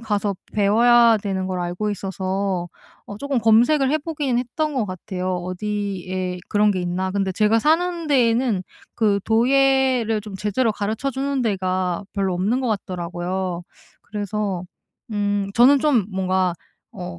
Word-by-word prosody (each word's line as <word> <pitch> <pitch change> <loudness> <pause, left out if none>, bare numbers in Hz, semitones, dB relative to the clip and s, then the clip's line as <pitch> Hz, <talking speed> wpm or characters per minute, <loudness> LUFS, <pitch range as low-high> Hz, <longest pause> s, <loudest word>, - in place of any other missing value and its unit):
가서 205 -3 -1 0.2
배워야 230 +3 +5
되는 190 -2 -3
걸 185 -1 -3
알고 175 +4 -2
있어서 190 -2 -2 0.4
어 205 - -8
쪼금 280 -2 -1
검색을 245 +6 +4
해 310 - +3
보긴 290 -5 -2
했던 290 +5 -2
것 245 -5 +1
같아요, 185 0 -4
어디에 185 -1 -3
그런 210 0 +3
게 185 - -2
있나. 180 +2 -2
근데 195 -1 -1
제가 215 +3 +3
사는 335 +4 +1
데에는 235 -6 +2 0.3
그 210 -3 +2
도예를 255 -1 +3
좀 210 -2 -9
제대로 210 +3 0
가르쳐 215 +7 -2
주는 270 +1 -2
데가 185 -3 -1
별로 195 -2 0
없는 210 +9 0
것 250 - -1
같더라고요. 180 -2 -3 0.4
그래서 205 -3 -3 0.5
음 205 -1 0
저는 265 +4 +6
좀 270 -9 +3
뭔가 185 -1 +1 0.4
어 180 -4 -7
205 Hz, 280 characters per minute, -22 LUFS, 185-240 Hz, 0.5 s, 저는